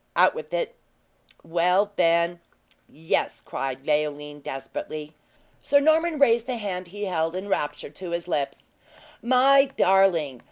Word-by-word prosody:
Out - - +5
with 480 - -8
it." - - -2 0.7
"Well, 180 +5 +2
then 170 0 +2 0.5
yes!" 160 +2 -2
cried 135 0 -5
Leoline 150 -1 -1
desperately. 150 +3 -6 0.5
Sir 285 - +4
Norman 315 +2 +2
raised 235 -4 +3
the 255 -2 -2
hand 185 -4 -4
he 205 +3 -6
held, 165 -2 -1
in 190 +2 -5
rapture 145 -7 -2
to 185 +2 -7
his 170 0 -4
lips: 145 -5 -3 0.5
"My 265 +3 +5
darling! 190 - +2
180 Hz, 130 wpm, -25 LUFS, 155-235 Hz, 0.7 s, Out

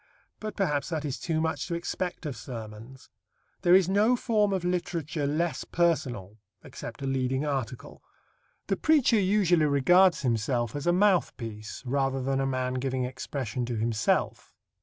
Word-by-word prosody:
But 215 0 -5
perhaps 150 -7 0
that 155 -3 -3
is 140 -2 -3
too 160 -2 -1
much 160 -3 -1
to 170 - -2
expect 175 +1 -4
of 145 -4 -3
sermons. 115 +2 -9 0.5
There 175 +1 +6
is 190 -2 +5
no 210 +6 +3
form 215 -4 +1
of 185 -2 -1
literature 170 -4 -2
less 155 0 -1
personal 125 - -1 0.2
except - - -9
a - - -2
leading 135 +1 0
article. 130 -4 -4 0.6
The - - -1
preacher 285 -8 +4
usually 185 -5 +3
regards 175 +7 +4
himself 120 0 0
as 145 +3 -4
a - - +5
mouthpiece 135 - 0
rather 135 +1 0
than 135 +1 -1
a 135 - 0
man 130 -1 -1
giving 130 -1 -1
expression 125 -2 -4
to 120 - -3
himself. 110 -1 -1
140 Hz, 155 wpm, -28 LUFS, 125-175 Hz, 0.6 s, There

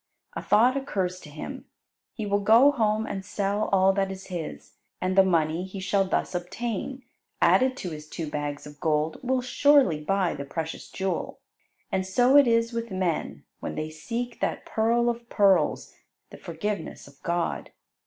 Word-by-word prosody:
A - - -4
thought 245 +4 +4
occurs 190 -9 -2
to 150 - -12
him. 150 +1 -8 0.5
He 220 - -4
will 200 0 +1
go 230 +7 +6
home 220 -4 +1
and 195 -3 -5
sell 200 +2 -1
all 195 0 +4
that 195 0 0
is 190 0 -8
his, 175 -4 -6 0.3
and 185 0 -1
the 195 - +8
money 165 -2 +1
he 190 +1 -7
shall 195 +1 +1
thus 185 - -1
obtain, 230 +8 -4 0.4
added 260 0 +4
to 180 - -5
his 155 0 -9
two 165 - -5
bags 145 -1 -4
of 145 0 -12
gold, 155 -1 0
will 255 0 0
surely 255 - +4
buy 195 +1 +1
the 140 - -5
precious 160 +3 -5
jewel. 190 -1 -3 0.5
And 190 - 0
so 245 +8 +3
it 285 -3 +8
is 230 0 +2
with 230 0 -3
men 185 -4 -2 0.2
when - - -5
they 155 0 -4
seek 235 +9 -5
that - - -2
pearl 235 +2 +1
of 235 0 -2
pearls, 200 -3 +2 0.4
the - - -10
forgiveness 195 +2 -5
of 140 0 -19
God. 170 0 -2
195 Hz, 175 wpm, -26 LUFS, 170-230 Hz, 0.5 s, the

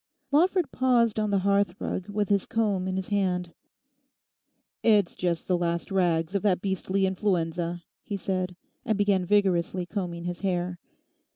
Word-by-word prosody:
Lawford 350 +3 +3
paused 240 -4 +2
on 215 -1 0
the 200 - +2
hearth 200 -2 +2
rug 185 +2 -4
with 205 -1 -1
his 200 -2 +2
comb 205 -5 0
in 185 - -2
his 190 -1 -3
hand. 180 -4 0 1.3
'It's 205 -5 +3
just 170 -2 -2
the 185 - +2
last 170 +1 -2
rags 175 -2 +1
of 200 - +1
that 195 -4 +2
beastly 190 0 0
influenza,' 175 -3 -1 0.2
he 205 - -4
said, 185 -1 -2 0.3
and 215 - 0
began 200 -3 +2
vigorously 185 -3 +2
combing 175 -3 -4
his 175 0 -4
hair. 180 -2 -1
190 Hz, 155 wpm, -27 LUFS, 175-205 Hz, 1.3 s, Lawford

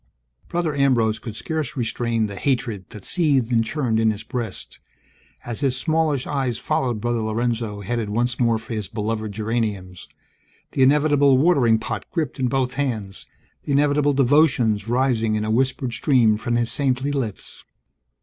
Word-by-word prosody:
Brother 170 -3 -1
Ambrose 120 -6 +2
could 110 -2 -7
scarce 155 +1 -3
restrain 115 -1 0
the 100 -1 -6
hatred 115 -5 -2
that 105 -4 -10
seethed 140 -9 +1
and 115 -1 +3
churned 115 -3 -1
in 110 0 +3
his 110 -1 -3
breast, 115 -6 -6 0.7
as 120 -2 -5
his 135 -3 0
smallish 155 -2 0
eyes 130 -5 -1
followed 130 -8 -1
Brother 120 +1 -1
Lorenzo 110 -1 -2
headed 110 +1 -2
once 120 +3 -1
more 115 -2 +3
for 110 +1 -8
his 105 -3 -3
beloved 110 0 -3
geraniums, 105 -4 -3 0.6
the 135 - -1
inevitable 145 0 +4
watering 135 -7 +4
pot - - -5
gripped 160 -5 -3
in 130 - +1
both 125 0 0
hands, 110 -9 -3 0.3
the 145 - -3
inevitable 145 0 +3
devotions 130 -6 +3
rising 120 -3 +1
in 105 0 -1
a 110 - -1
whispered 130 +1 0
stream 120 -5 +3
from 115 +2 -2
his 120 0 0
saintly 135 0 0
lips. 125 -8 -5
120 Hz, 160 wpm, -22 LUFS, 110-140 Hz, 0.7 s, inevitable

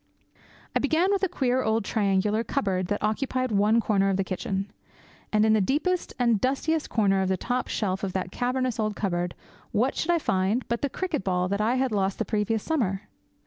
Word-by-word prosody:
I - - +4
began 320 +7 +2
with 400 - +1
a 385 - +1
queer 260 -6 +1
old 220 -2 0
triangular 210 +1 +1
cupboard 190 -9 -1
that 205 +1 -2
occupied 255 +3 0
one 210 +3 +3
corner 200 -3 +2
of 190 - +1
the 195 - +1
kitchen. 190 +1 -3 0.6
And 215 0 +3
in 220 - +4
the 215 - +3
deepest 315 - 0
and 235 -4 +2
dustiest 295 +4 0
corner 195 -4 +2
of 190 - 0
the 190 - +1
top 250 +7 -2
shelf 190 -2 -2
of 190 -2 -2
that 185 -1 -2
cavernous 250 0 -1
old 215 -1 0
cupboard, 175 -3 -2 0.4
what 250 +6 +1
should 325 - -2
I 345 - +4
find 205 - 0
but 235 0 -1
the 285 - 0
cricket 350 - -2
ball 180 -1 0
that 200 +1 0
I 230 +4 +2
had 260 -1 +1
lost 195 -2 0
the - - -1
previous 215 0 0
summer? 215 - -1
215 Hz, 205 wpm, -26 LUFS, 195-255 Hz, 0.6 s, I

